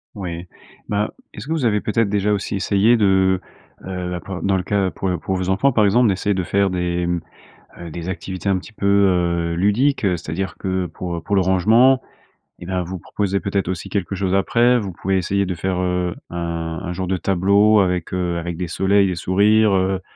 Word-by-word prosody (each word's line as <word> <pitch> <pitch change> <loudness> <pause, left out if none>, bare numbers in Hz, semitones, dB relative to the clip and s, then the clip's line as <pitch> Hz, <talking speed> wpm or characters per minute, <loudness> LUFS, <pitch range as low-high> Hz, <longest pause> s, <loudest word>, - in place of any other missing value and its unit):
Ouais. 90 -3 -6 0.4
Bah, 105 +1 0 0.2
est-ce - - -9
que 160 - -1
vous 155 -6 -1
avez, 105 -3 +2
peut-être, 110 -1 0
déjà 105 0 +1
aussi 100 0 -2
essayé 100 +4 +3
de, 95 -3 +3 0.4
heu, 90 -1 -4
b - - -16
p 95 - -7
dans 95 -1 +2
le 90 - -2
cas 95 -1 0
pour 95 - -3
pour 95 - -2
vos 95 0 -2
enfants 105 +9 +3
par 110 -4 +3
exemple, 120 +5 +4
d'essayer 100 0 0
de 95 - -1
faire 100 +2 +1
des, 90 -1 -1
mmh, 90 -1 -1 0.6
heu, 85 -1 -7
des 85 +2 -6
activités 95 +1 -5
un 95 - +2
petit 110 +4 -13
peu, 105 - -7
heu, 90 -4 +2
ludique, 105 +11 +2
c'est-à-dire 90 -1 -2
que 95 -1 -1
pour 85 -1 -5
pour 100 - -1
le 100 - +4
rangement, 110 +8 +4 0.6
eh - - -9
ben, 90 0 -2
vous 90 +2 -6
proposez 100 +2 -2
peut-être 100 -2 -2
aussi 90 -2 -4
quelque 100 -1 -2
chose 95 0 0
après. 120 +5 +3
Vous 100 -4 -4
pouvez 95 +2 -1
essayer 100 +2 0
de 90 -1 -3
faire, 90 +2 -2
heu, 90 -1 -1 0.2
un 85 -1 -4
un 90 - -4
genre 95 +1 -4
de 95 - 0
tableau 100 +4 +3
avec, 90 -3 0
heu, 90 -2 -1
avec 85 0 -4
des 90 0 -3
soleils, 95 +3 +2
des 90 - -2
sourires, 105 +5 +3
heu, 95 0 +1
95 Hz, 210 wpm, -20 LUFS, 90-100 Hz, 0.6 s, exemple